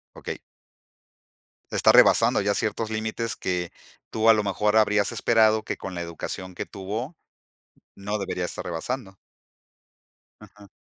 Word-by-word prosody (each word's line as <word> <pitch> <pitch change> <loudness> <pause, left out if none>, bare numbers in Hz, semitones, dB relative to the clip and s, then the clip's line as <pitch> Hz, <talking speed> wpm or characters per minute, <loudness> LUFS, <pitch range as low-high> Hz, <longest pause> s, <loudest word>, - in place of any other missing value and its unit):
Okey. - - -6 1.3
Está - - +5
rebasando - - +5
ya 100 0 +1
ciertos 110 +1 -2
límites 110 +1 -3
que 90 -2 -2 0.4
tú, 110 0 +1
a 115 - +9
lo 105 - +1
mejor, 105 +1 0
habrías 105 -2 +3
esperado 110 -1 +3
que - - -4
con 95 - -7
la 85 - -4
educación 90 +2 -7
que - - -4
tuvo 110 - -6 0.8
no 105 +2 -4
debería 95 -2 -3
estar - - -6
rebasando. 95 +4 -5 1.2
Ajá. 105 0 -16
105 Hz, 135 wpm, -25 LUFS, 95-110 Hz, 1.3 s, a